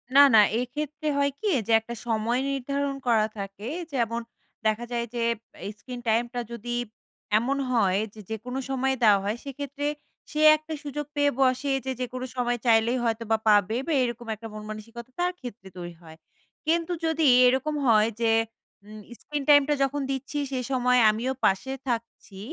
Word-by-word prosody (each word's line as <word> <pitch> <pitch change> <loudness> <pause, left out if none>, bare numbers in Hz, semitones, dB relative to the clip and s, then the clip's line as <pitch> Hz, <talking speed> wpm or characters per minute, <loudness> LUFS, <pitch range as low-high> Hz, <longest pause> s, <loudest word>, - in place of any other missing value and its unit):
না, 280 - +10
না 220 - +9 0.2
এক্ষেত্রে 300 +4 -4
হয় 280 0 +2
কি? 435 - -2 0.2
যে - - 0
একটা 225 +2 -8
সময় 230 +2 +1
নির্ধারণ 275 +1 -2
করা 225 -3 +4
থাকে। 200 +2 -6 0.3
যেমন 235 -2 0 0.4
দেখা 220 +2 +1
যায় 235 -1 -1
যে, 240 - -2 0.4
অ্যা - - -5
screen 245 0 -8
টাইম 230 +2 +3
টা 245 - -2
যদি 240 +1 -4 0.6
এমন 265 +5 0
হয়, 200 -6 +3
যে 220 - -13
যেকোনো 245 +4 -4
সময় 265 0 0
দেওয়া 205 -2 +6
হয় 210 +3 -1
সেক্ষেত্রে 285 +1 -4 0.4
সে 305 - -1 0.2
একটা 310 +1 -8
সুযোগ 295 0 -4
পেয়ে 290 0 +3
বসে, 260 +1 +2
যে 265 - -1
যেকোনো 255 0 -4
সময় 245 -1 0
চাইলেই 230 +2 +4
হয়তো 230 -1 0
বা 220 - +5
পাবে 210 +1 +4
বা 325 - +1
এরকম 240 -1 -4
একটা 225 +2 -9
মনমানসিকতা 215 +3 -8
তার 355 +1 +2
ক্ষেত্রে 230 -6 -9
তৈরি 175 -1 -6
হয়। 160 -1 -13 0.5
কিন্তু 335 +2 +1
যদি 320 0 +1 0.2
এরকম 265 +4 +2
হয় 220 0 +5
যে 225 -1 +3 0.5
উম 215 +1 -10 0.2
screen 295 -1 -4
টাইমটা 290 0 +6
যখন 280 +1 -1
দিচ্ছি 270 +2 -4
সে 260 - -1
সময় 250 -1 +3
আমিও 235 +5 -1
পাশে 195 +8 +1
থাকছি 230 -4 -4
245 Hz, 170 wpm, -26 LUFS, 220-275 Hz, 0.6 s, না